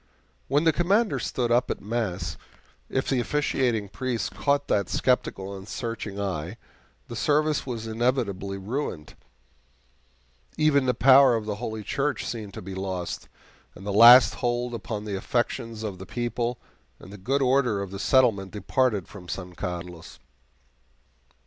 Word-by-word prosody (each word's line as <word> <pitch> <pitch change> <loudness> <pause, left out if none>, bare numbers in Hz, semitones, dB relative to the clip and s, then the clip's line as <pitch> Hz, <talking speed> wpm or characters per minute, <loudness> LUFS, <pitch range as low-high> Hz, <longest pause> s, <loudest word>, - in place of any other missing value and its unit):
When 145 +3 +2
the 165 -1 +4
Commander 200 +6 +2
stood 120 -2 -2
up 120 +1 +3
at - - -2
mass, 95 -7 -3 0.5
if 130 - -1
the 135 - +1
officiating 125 -5 0
priest 125 +2 -3
caught 140 0 0
that 100 -1 +1
skeptical 100 -6 0
and 95 +1 -10
searching 115 -4 -5
eye, 95 0 -3 0.5
the - - -7
service 150 +3 +1
was 115 -3 -4
inevitably 110 -4 -1
ruined. 100 - -4 1.4
Even 140 -3 +3
the 125 - +2
power 135 0 +7
of 110 -2 -3
the 105 -1 -3
Holy 110 -2 -5
Church 140 +7 -1
seemed 105 -4 -6
to - - -7
be 95 +1 -7
lost, 95 -2 -4 0.5
and 95 - -11
the 100 - -2
last 120 +4 +9
hold 120 0 -1
upon 110 -2 -5
the 105 -2 -3
affections 115 +2 -2
of 100 -4 -5
the 95 - -9
people 120 +1 -2 0.4
and 95 - -13
the - - -9
good 135 +8 0
order 125 -5 +2
of 100 -1 -5
the 100 - -6
settlement 110 -5 +3
departed 105 -1 0
from 90 -4 -12
San 90 -2 -5
Carlos. 85 -1 -6
115 Hz, 150 wpm, -26 LUFS, 100-130 Hz, 1.4 s, last